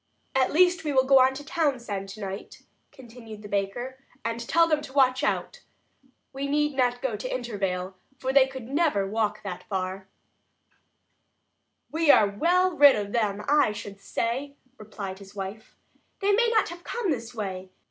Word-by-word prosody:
"At 265 -1 +2
least 355 +1 +4
we 300 - -1
will 260 -2 +4
go 270 0 +6
on 260 +1 +4
to 290 +1 -8
Townsend 240 - -2
tonight," 195 -1 -7 0.3
continued 230 -4 -12
the - - -7
baker, 205 +6 -3 0.3
"and 230 0 -2
tell 335 0 +4
them 305 -2 +1
to 280 -3 -10
watch 255 -2 +3
out. - - -1 0.7
We 275 +1 -3
need 295 +1 +1
not 245 -2 +1
go 255 -5 -1
to 235 +5 -5
Intervale, 195 -6 -3 0.2
for 260 +1 -2
they 270 -1 +6
never 275 -3 +1
could 195 - -5
walk 215 -1 -1
so 190 -3 -4
far." 190 -1 -3 1.8
"We 325 -1 +1
are 210 - +7
well 350 - +2
rid 285 -2 +8
of 205 -1 -3
them, 210 -3 -1
I 290 -7 +4
should 205 -1 -8
say," 265 +8 -3 0.2
replied 200 -3 -7
his 195 0 -14
wife. 200 +2 -7 0.4
"They 400 0 +2
may 465 +3 +3
not 440 -2 +2
have 345 0 -9
come 445 -5 -2
this 235 -3 -4
way. 190 -3 -5
245 Hz, 170 wpm, -26 LUFS, 205-285 Hz, 1.8 s, rid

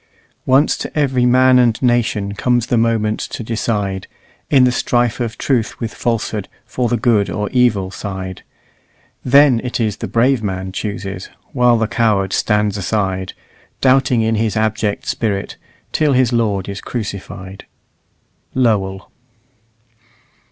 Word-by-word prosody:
"Once 135 +4 +4
to - - -5
every 130 -4 +2
man 130 +1 +5
and 120 -3 +2
nation 115 -5 +1
comes 120 +3 +1
the 120 - 0
moment 115 -2 +1
to - - -5
decide, 105 -4 -2 0.4
In 135 -3 +5
the 125 - +4
strife 120 -2 0
of 115 -2 -3
Truth 125 -6 -1
with 115 - -4
Falsehood, 110 -4 -2 0.2
for 125 -2 -2
the 120 - +1
good 110 -3 +2
or 105 -1 -3
evil 110 -7 +2
side..... 95 -2 -6 0.8
Then 135 -2 +5
it 125 -1 -3
is 110 -3 -1
the - - -5
brave 125 +1 +2
man 95 -2 -3
chooses, 95 -1 -5 0.2
while 125 -2 +4
the 110 - +1
coward 105 -5 +1
stands 105 -1 +1
aside, 95 -1 -2 0.5
Doubting 130 -3 +3
in 110 0 +1
his 110 -1 0
abject 110 -1 -1
spirit, 100 -4 -2 0.3
till 150 -2 +2
his 125 -1 +2
Lord 105 -5 0
is 100 0 -6
crucified." 100 -4 -7 0.9
LOWELL. 100 -6 0
110 Hz, 135 wpm, -18 LUFS, 100-125 Hz, 0.9 s, man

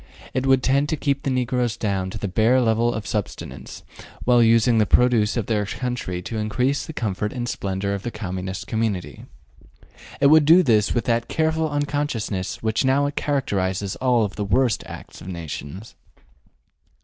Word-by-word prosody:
It 130 +1 -1
would 130 -1 +4
tend 140 +2 +2
to 155 - -1
keep 140 -1 -1
the - - -2
negroes 125 -2 0
down 95 -3 -1
to - - -6
the 105 - -3
bare 110 +7 +3
level 115 0 +2
of 110 -3 -5
subsistence, 105 +1 -5 0.4
while 120 -1 +4
using 115 0 +4
the 105 - +3
produce 120 -3 +3
of 115 - -1
their 105 -2 0
country 120 -8 -4
to 110 +4 -4
increase 125 +6 0
the - - -5
comfort 105 -6 -2
and 120 -2 -4
splendor 100 -2 -2
of 100 - -3
the 120 - -4
Communist 95 -2 -5
community. 110 -5 -3 0.9
It 140 - +2
would 155 -1 +6
do 170 +4 +7
this 110 -7 +2
with 120 - 0
that 115 -1 0
careful 160 0 0
unconsciousness 145 -11 -2
which 110 +3 +1
now 135 +2 +2
characterizes 100 -10 -1
all 120 -4 +2
the 100 +1 -5
worst 120 +4 +1
acts - - -10
of 85 - -10
nations. 85 +2 -7
115 Hz, 170 wpm, -23 LUFS, 100-130 Hz, 0.9 s, do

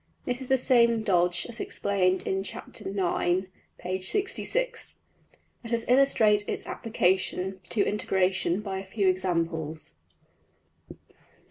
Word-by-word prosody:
} - - -39
This 245 +1 -2
is 260 - -7
the 265 - +3
same 235 -3 +3
dodge 175 -3 +1
as 235 -1 -6
explained 190 -2 0
in 190 0 -1
Chap.~IX., 195 0 -6 0.9
\Pageref{chap:IX}. 390 - -1 0.7
Let 230 0 -5
us 230 0 0
illustrate 230 -5 +4
its - - -2
application 190 -3 0
to 210 - +2
integration 190 -2 0
by 195 -2 -4
a - - -6
few 195 +1 -1
examples. 165 -4 -1
195 Hz, 115 wpm, -27 LUFS, 185-235 Hz, 0.9 s, illustrate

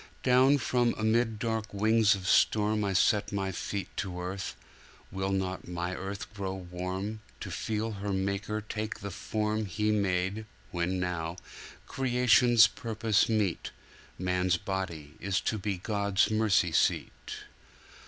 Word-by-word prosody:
'Down 130 +2 +5
from 120 -1 +1
amid 110 +1 +1
dark 110 -1 -2
wings 110 +1 +4
of 95 -1 -6
storm 105 +1 +3
I 100 - 0
set 105 +2 +3
My 95 -2 -1
Feet 100 +2 -4
To 90 -3 -3
earth. 95 +2 -4 0.6
Will 95 0 -2
not 95 -1 -2
My 90 +1 -3
earth 100 +3 -6
grow 95 -2 -3
warm 95 +3 -4 0.2
To - - -5
feel 110 +1 -2
her 100 -1 -4
Maker 100 +3 -1
take 110 +1 -5
the 100 0 -5
form 105 +2 -2
He 105 +5 0
made, 100 +1 0 0.2
when 90 +1 -1
now, 85 -1 -2 0.5
Creation's 125 -2 +5
purpose 110 -2 +1
meet, 105 -6 0 0.5
Man's 90 0 +1
body 85 -7 -4
is 100 -2 0
to 110 - -1
be 100 -1 -2
God's 100 +2 +1
Mercy 110 -5 +3
seat? - - 0
100 Hz, 135 wpm, -30 LUFS, 95-110 Hz, 0.6 s, Down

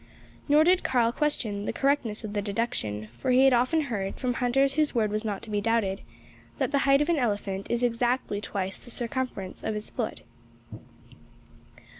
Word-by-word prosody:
Nor 300 +2 +6
did 360 +2 +4
Karl 235 -2 +2
question 225 -8 -1
the - - -1
correctness 265 -6 0
of 210 -1 -5
the 205 - 0
deduction: 195 - -2
for - - -2
he 255 +1 +5
had 270 -1 +6
often 255 +7 +3
heard, 205 -9 -3
from 250 -1 -1
hunters 270 +3 +2
whose 305 -2 +1
word 215 -3 +2
was 215 +1 -1
not 205 -3 -3
to 220 - -9
be 205 -1 0
doubted, 210 -3 0 0.6
that - - 0
the 280 - +2
height 275 +1 +6
of 305 - -4
an 335 -3 +2
elephant 205 -4 -2
is 240 +1 0
exactly 240 -3 0
twice 190 -2 -3
the 245 - -13
circumference 240 -5 -4
of 215 - -2
his 210 0 -4
foot. - - -4
235 Hz, 185 wpm, -27 LUFS, 205-265 Hz, 0.6 s, Nor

